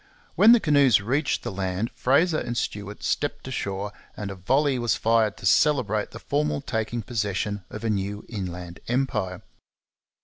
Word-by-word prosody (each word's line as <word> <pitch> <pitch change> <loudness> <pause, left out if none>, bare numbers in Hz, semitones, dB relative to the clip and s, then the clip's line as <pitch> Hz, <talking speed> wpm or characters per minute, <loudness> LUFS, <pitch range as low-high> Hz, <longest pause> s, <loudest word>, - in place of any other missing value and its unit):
When 225 - +7
the 240 - +7
canoes 140 - +4
reached 135 +8 0
the - - -3
land 95 +3 -2
Fraser 155 +5 +2
and 120 0 -4
Stuart 105 -2 -4
stepped 145 -2 -2
ashore, 100 -5 -3 0.3
and 100 -2 -4
a - - -6
volley 135 +8 +1
was 120 -4 +1
fired 110 -2 +2
to - - -9
celebrate 110 -3 +3
the - - -9
formal 150 0 -1
taking 115 -2 -3
possession 105 -3 -2
of 110 - -8
a 115 - 0
new 100 0 -3
inland 90 -4 -6
empire. 115 -8 -1
110 Hz, 160 wpm, -25 LUFS, 100-135 Hz, 0.3 s, When